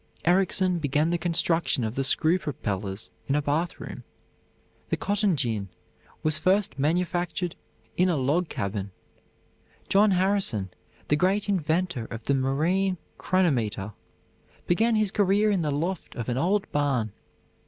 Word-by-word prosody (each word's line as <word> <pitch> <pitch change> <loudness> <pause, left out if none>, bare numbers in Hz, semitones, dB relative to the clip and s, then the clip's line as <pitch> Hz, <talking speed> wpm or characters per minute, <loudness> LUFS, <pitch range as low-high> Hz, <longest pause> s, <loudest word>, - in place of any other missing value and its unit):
Ericsson 185 0 +3
began 150 +2 +1
the 175 - +1
construction 165 -5 +1
of 110 0 -2
the 135 - -1
screw 160 +6 +3
propellers 100 - -4 0.2
in 140 - +1
a 150 - +2
bathroom. 155 +5 -3 0.9
The - - 0
cotton 205 -2 +1
gin 110 -8 -1 0.5
was 155 0 +2
first 185 -6 +1
manufactured 175 +2 0 0.4
in 180 +1 +4
a 170 - +1
log 145 +6 +1
cabin. 100 0 -3 1.0
John 205 +2 +5
Harrison, 185 - +1 0.4
the 150 - +3
great 190 +6 +1
inventor 170 - 0
of 115 0 -7
the 140 - +1
marine 165 +9 +1 0.2
chronometer, 115 - 0 0.7
began 225 +6 +2
his 215 -2 +2
career 205 +1 +3
in 195 -3 +1
the 155 - -1
loft 165 +5 -3
of 120 -1 -4
an 120 - 0
old 195 +6 0
barn. 135 -7 0
165 Hz, 135 wpm, -26 LUFS, 135-185 Hz, 1.0 s, John